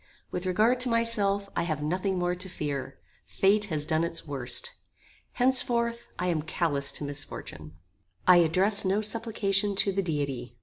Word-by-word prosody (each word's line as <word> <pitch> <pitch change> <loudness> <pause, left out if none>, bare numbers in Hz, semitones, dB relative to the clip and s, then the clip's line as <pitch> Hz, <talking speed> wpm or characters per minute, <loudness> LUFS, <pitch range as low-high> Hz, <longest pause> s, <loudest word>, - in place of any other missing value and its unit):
With 180 +1 -3
regard 220 +7 +3
to 250 0 +3
myself, 210 -4 +1
I - - +1
have 155 -3 -2
nothing 185 +4 -1
more 175 0 0
to 180 +1 -4
fear. 140 -5 -4 0.3
Fate 205 +2 +2
has 155 -6 -2
done 160 +1 +1
its 170 0 -3
worst. 130 -5 0 0.6
Henceforth, 240 -2 +1
I 180 - -2
am 170 -4 0
callous 150 -3 -1
to - - -3
misfortune. 85 - -7 0.5
I 180 -1 +7
address 185 +5 +3
no 195 +2 +1
supplication 210 -2 +1
to 195 - +2
the 195 +1 0
Deity. 140 -8 -3
180 Hz, 160 wpm, -28 LUFS, 150-210 Hz, 0.6 s, I